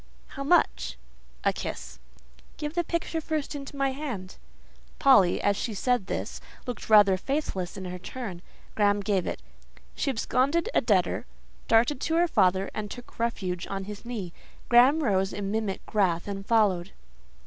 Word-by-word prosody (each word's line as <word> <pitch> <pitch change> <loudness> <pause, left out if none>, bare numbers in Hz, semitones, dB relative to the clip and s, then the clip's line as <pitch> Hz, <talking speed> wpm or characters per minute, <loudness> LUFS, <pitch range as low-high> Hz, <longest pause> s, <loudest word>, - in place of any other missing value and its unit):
"How 275 - -6
much?" 345 +5 +2 0.5
"A - - +3
kiss." - - -6 0.6
"Give 300 0 -4
the 345 0 +1
picture 335 -1 -2
first 310 -2 -2
into 280 -1 -7
my 275 -1 +1
hand." 255 -10 -6 0.6
Polly, 200 -10 +5
as 205 0 +2
she 220 +1 -3
said 245 -1 +1
this, - - -4 0.2
looked 245 -5 -6
rather 205 -3 +7
faithless 190 - -3
in 190 - -6
her 180 0 -5
turn. 190 -3 -6 0.3
Graham 205 -1 +2
gave 195 -3 0
it. - - -4 0.5
She - - -1
absconded 275 - +1
a - - +4
debtor, - - +1 0.4
darted 235 +4 +3
to 325 - 0
her 345 +1 +4
father, 190 - +2
and 210 -1 -4
took 245 +2 -11
refuge 190 -6 -2
on 195 0 -4
his 205 +1 -8
knee. 215 -8 -5 0.4
Graham 260 +6 +6
rose 195 -5 +1
in 200 -1 -3
mimic 215 -3 -2
wrath 185 -5 +2
and 195 -1 -5
followed. 200 -5 +2
215 Hz, 160 wpm, -27 LUFS, 195-275 Hz, 0.6 s, rather